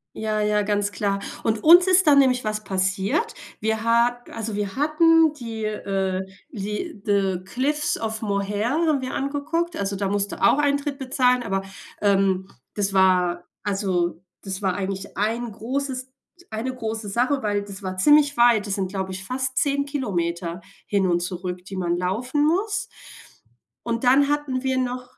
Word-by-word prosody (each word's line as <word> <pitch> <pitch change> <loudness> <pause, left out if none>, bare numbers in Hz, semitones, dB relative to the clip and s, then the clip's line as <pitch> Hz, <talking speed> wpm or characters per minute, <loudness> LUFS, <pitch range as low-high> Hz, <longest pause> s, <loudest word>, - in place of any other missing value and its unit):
Ja, 215 -1 -1
ja, 210 0 +2
ganz 205 0 0
klar. 200 0 -1 0.2
Und 220 -1 0
uns 345 +3 +8
ist 370 -2 +5
dann 285 -1 +7
nämlich 255 -2 +3
was 215 0 -2
passiert. 195 - 0 0.3
Wir 220 +1 -1
ha 235 +1 +3
also, 220 -2 -4
wir 205 -1 -3
hatten 315 +2 +4
die, 230 -6 -6
äh, 195 -3 -2 0.3
die 210 - -5
The 195 -3 +1
Cliffs 290 +8 -1
of 220 -1 -3
Moher 205 +1 -1
haben 310 -2 +1
wir 255 - -4
angeguckt, 310 +5 -2
also, 200 -4 -2
da 195 0 -1
musst 200 0 0
du - - -8
auch - - +5
Eintritt 285 -1 0
bezahlen, 250 -2 +2
aber, 195 -4 -1 0.4
ähm, 195 -2 +2 0.3
das 200 -1 -1
war 180 -2 +3 0.2
also, 185 -4 -1 0.2
das 195 0 -5
war 190 -2 0
eigentlich 195 0 -5
ein 225 +3 -1
großes 260 +3 -4 0.4
eine 235 +4 -3
große 220 -3 -4
Sache, 250 +6 +1
weil 205 -1 -1
das 200 0 -9
war 185 -1 -5
ziemlich 290 +4 +5
weit. 235 -3 +4
Das 195 - -1
sind, 190 -2 -2
glaube 190 -1 -3
ich, 185 0 -6
fast 260 +3 -3
10 280 0 +1
Kilometer 175 - -3 0.2
hin 195 -2 +1
und 175 0 +2
zurück, 180 0 -5
die 195 - -8
man 175 -2 -1
laufen 245 +11 0
muss. 405 +5 0 0.9
Und 235 +1 -2
dann 275 +3 +5
hatten 290 -3 -1
wir 260 0 0
noch 250 0 -4
220 Hz, 165 wpm, -23 LUFS, 195-270 Hz, 0.9 s, uns